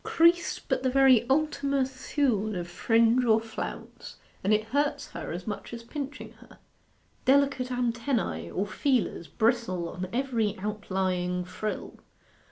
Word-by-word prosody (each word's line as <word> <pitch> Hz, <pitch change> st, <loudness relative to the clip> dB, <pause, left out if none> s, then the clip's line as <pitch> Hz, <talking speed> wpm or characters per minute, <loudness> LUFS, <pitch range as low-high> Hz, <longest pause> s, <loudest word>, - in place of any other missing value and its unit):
Crease 340 Hz, +1 st, +3 dB
but -, -, -2 dB
the 260 Hz, -, +1 dB
very 255 Hz, -3 st, +5 dB
Ultima 280 Hz, -1 st, +1 dB
Thule 260 Hz, -5 st, -1 dB
of 175 Hz, -1 st, -3 dB
fringe 230 Hz, +6 st, +3 dB
or 225 Hz, -2 st, +4 dB
flounce, 225 Hz, 0 st, -7 dB, 0.3 s
and 195 Hz, -, +1 dB
it 215 Hz, 0 st, +3 dB
hurts 285 Hz, +3 st, 0 dB
her -, -, -6 dB
as 175 Hz, +2 st, -5 dB
much 220 Hz, +2 st, -5 dB
as 230 Hz, -, -9 dB
pinching 280 Hz, +4 st, -6 dB
her. -, -, -17 dB, 0.7 s
Delicate 270 Hz, -1 st, +3 dB
antennae, 235 Hz, -, -1 dB
or 195 Hz, -, -1 dB
feelers, 235 Hz, -, 0 dB
bristle 220 Hz, -2 st, 0 dB
on 185 Hz, +1 st, -5 dB
every 235 Hz, -5 st, 0 dB
outlying 185 Hz, -3 st, -2 dB
frill. 210 Hz, +4 st, -5 dB
230 Hz, 135 wpm, -28 LUFS, 200-265 Hz, 0.7 s, very